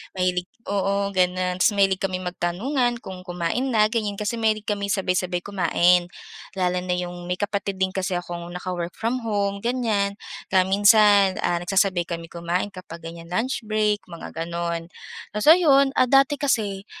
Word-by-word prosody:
mahilig 180 Hz, -1 st, 0 dB, 0.2 s
oo 200 Hz, 0 st, 0 dB
ganon. 180 Hz, 0 st, +1 dB
Tapos 185 Hz, -, +4 dB
mahilig 195 Hz, -1 st, +3 dB
kaming 185 Hz, -1 st, -2 dB
magtanungan 240 Hz, +9 st, -1 dB
kung 185 Hz, -1 st, -9 dB
kumain 180 Hz, +9 st, -2 dB
na, 215 Hz, -1 st, +5 dB
ganyan. 215 Hz, -3 st, -1 dB
Kasi 210 Hz, +2 st, -2 dB
mahilig 215 Hz, -2 st, 0 dB
kami 205 Hz, -1 st, -1 dB
sabay-sabay 185 Hz, -2 st, 0 dB
kumain. 180 Hz, -2 st, +2 dB, 0.5 s
Lalo 180 Hz, -1 st, 0 dB
na 180 Hz, 0 st, -1 dB
yung 175 Hz, 0 st, -4 dB
may 180 Hz, +1 st, -3 dB
kapatid 200 Hz, -1 st, -2 dB
din 190 Hz, -, +3 dB
kasi 190 Hz, 0 st, -1 dB
akong 175 Hz, -1 st, -5 dB
naka-work 180 Hz, -1 st, -4 dB
from 230 Hz, +3 st, -2 dB
home, 200 Hz, -2 st, -1 dB
ganyan. 225 Hz, -5 st, 0 dB, 0.4 s
Kaya 190 Hz, -, +6 dB
minsan, 205 Hz, -1 st, +5 dB
ah, 175 Hz, -, +1 dB
nagsasabay 185 Hz, 0 st, +1 dB
kami 165 Hz, -1 st, -6 dB
kumain 175 Hz, +3 st, -2 dB
kapag 180 Hz, -3 st, -10 dB
ganyan 165 Hz, +1 st, -10 dB
lunch 240 Hz, +2 st, -1 dB
break, 215 Hz, -1 st, 0 dB
mga 170 Hz, -2 st, -9 dB, 0.2 s
ganon. 170 Hz, 0 st, -3 dB, 0.5 s
Tapos 210 Hz, +4 st, -2 dB
ayun! 285 Hz, -5 st, +6 dB
Ah, -, -, +5 dB
dati 275 Hz, +2 st, +4 dB
kasi, 210 Hz, -9 st, -1 dB
195 Hz, 160 wpm, -23 LUFS, 180-215 Hz, 0.5 s, Kaya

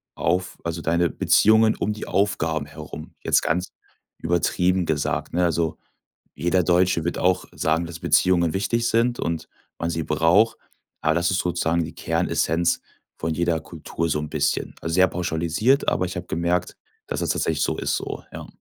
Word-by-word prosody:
auf 90 Hz, +2 st, -1 dB
also, 85 Hz, 0 st, -3 dB
deine 85 Hz, +1 st, +1 dB
Beziehungen 110 Hz, +5 st, +4 dB
um 105 Hz, -, -1 dB
die 105 Hz, -, -7 dB
Aufgaben 80 Hz, -6 st, 0 dB
herum, 75 Hz, -, -10 dB
jetzt -, -, +3 dB
ganz 90 Hz, +3 st, -1 dB, 0.5 s
übertrieben 90 Hz, +2 st, +1 dB
gesagt, 75 Hz, -2 st, -1 dB
ne? 90 Hz, +1 st, +2 dB
Also, 85 Hz, -1 st, 0 dB, 0.6 s
jeder 90 Hz, +1 st, +1 dB
Deutsche 90 Hz, -1 st, +2 dB
wird 85 Hz, -, -2 dB
auch 90 Hz, 0 st, +1 dB
sagen, 80 Hz, +2 st, 0 dB
dass 85 Hz, 0 st, -8 dB
Beziehungen 85 Hz, -3 st, +3 dB
wichtig 115 Hz, +4 st, 0 dB
sind 120 Hz, +1 st, +1 dB
und 85 Hz, -1 st, -2 dB, 0.3 s
man 85 Hz, -, -2 dB
sie 80 Hz, -1 st, -2 dB
braucht, 85 Hz, +9 st, +3 dB, 0.4 s
aber 80 Hz, +1 st, +2 dB
das 85 Hz, +1 st, +2 dB
ist 95 Hz, -, +1 dB
sozusagen 85 Hz, -1 st, 0 dB
die -, -, -7 dB
Kernessenz 85 Hz, +2 st, 0 dB, 0.4 s
von 80 Hz, 0 st, -2 dB
jeder 85 Hz, 0 st, 0 dB
Kultur 85 Hz, +1 st, -4 dB
so 75 Hz, -, 0 dB
'n 75 Hz, 0 st, -5 dB
bisschen. 75 Hz, -2 st, -1 dB
Also, 80 Hz, -, -3 dB
sehr 95 Hz, 0 st, +6 dB
pauschalisiert, 85 Hz, -, 0 dB
aber 90 Hz, -, 0 dB
ich 90 Hz, -, -6 dB
habe 90 Hz, 0 st, -5 dB
gemerkt, 85 Hz, +2 st, -1 dB, 0.3 s
dass -, -, -3 dB
das -, -, -2 dB
tatsächlich -, -, 0 dB
so -, -, -1 dB
ist -, -, -1 dB
so, -, -, -6 dB
ja. -, -, -8 dB
85 Hz, 170 wpm, -23 LUFS, 80-90 Hz, 0.6 s, sehr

